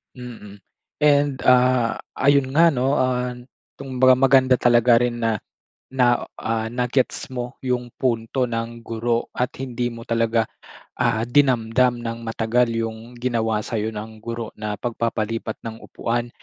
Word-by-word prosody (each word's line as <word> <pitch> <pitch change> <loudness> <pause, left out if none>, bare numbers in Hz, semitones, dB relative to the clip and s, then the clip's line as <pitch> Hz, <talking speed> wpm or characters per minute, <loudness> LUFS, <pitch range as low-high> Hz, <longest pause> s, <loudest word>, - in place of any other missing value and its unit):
Mm. 115 -5 -10 0.4
And 145 -2 +3
ah, 125 -2 +4 0.2
ayun 140 -1 +3
nga 165 +4 +5
'no, 135 -3 +1
ah, 125 -1 0 0.5
kumbaga 130 -1 +3
maganda 130 0 +5
talaga 120 0 +5
rin 120 -1 0
na 110 -2 +1 0.5
na 120 -2 +2
ah, 110 0 -1
na-gets 125 +3 -1
mo 125 -1 -6
yung 125 -2 -2
punto 125 +1 0
ng 115 0 -4
guro 115 +1 -1
at 125 - -1
hindi 125 -2 -3
mo 115 0 -10
talaga 115 -1 +1 0.5
ah, 115 -1 +1
dinamdam 120 -1 +2
nang 115 0 -4
matagal 115 +1 +1
yung 115 +1 -4
ginawa 115 -3 0
sa'yo 110 -2 -2
ng 110 +1 -8
guro 115 -1 -5
na 105 -1 -3
pagpapalipat 115 -2 -2
ng 115 -1 -7
upuan. 120 +1 -3
120 Hz, 135 wpm, -22 LUFS, 115-125 Hz, 0.5 s, nga